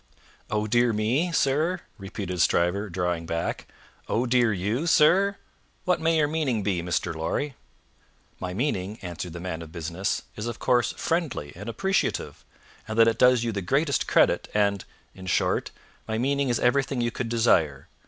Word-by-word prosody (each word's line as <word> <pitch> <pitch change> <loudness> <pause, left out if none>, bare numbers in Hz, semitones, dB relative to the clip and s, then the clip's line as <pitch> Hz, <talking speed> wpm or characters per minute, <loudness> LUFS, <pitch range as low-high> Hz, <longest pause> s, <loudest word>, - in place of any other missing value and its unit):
"Oh 105 0 0
dear 120 +2 +3
me, 120 +12 +1
sir?" 160 +5 +1 0.2
repeated 95 -2 -4
Stryver, 90 +5 +2
drawing 85 -2 -2
back. 85 0 -3 0.4
"Oh 120 +3 +1
dear 120 -2 +3
you, 105 - -1
sir? 190 +6 +4 0.5
What 180 -3 +1
may 165 0 +2
your 150 -1 +3
meaning 145 -8 -1
be, 95 -4 0
Mr. 85 -1 -1
Lorry?" 85 - -2 0.9
"My 90 - -4
meaning," 105 -2 -2
answered 90 -1 -6
the 85 - -6
man 85 -2 -4
of 80 -1 -10
business, 85 +3 -2
"is, 105 +2 -4
of 120 -1 -4
course, 120 -1 +2
friendly 160 - -2
and 105 +6 -7
appreciative, 195 +10 -1 0.4
and 110 0 -4
that 115 0 +7
it 115 0 +1
does 125 -2 +5
you 115 - -1
the 100 -2 -3
greatest 140 - +1
credit, - - +3
and 100 -2 +1 0.3
in 95 -1 -11
short, - - +1 0.4
my 110 0 -1
meaning 140 +2 +1
is 120 - +1
everything 135 +1 +1
you 120 0 0
could 115 0 -4
desire. 90 - +2
110 Hz, 165 wpm, -26 LUFS, 90-135 Hz, 0.9 s, that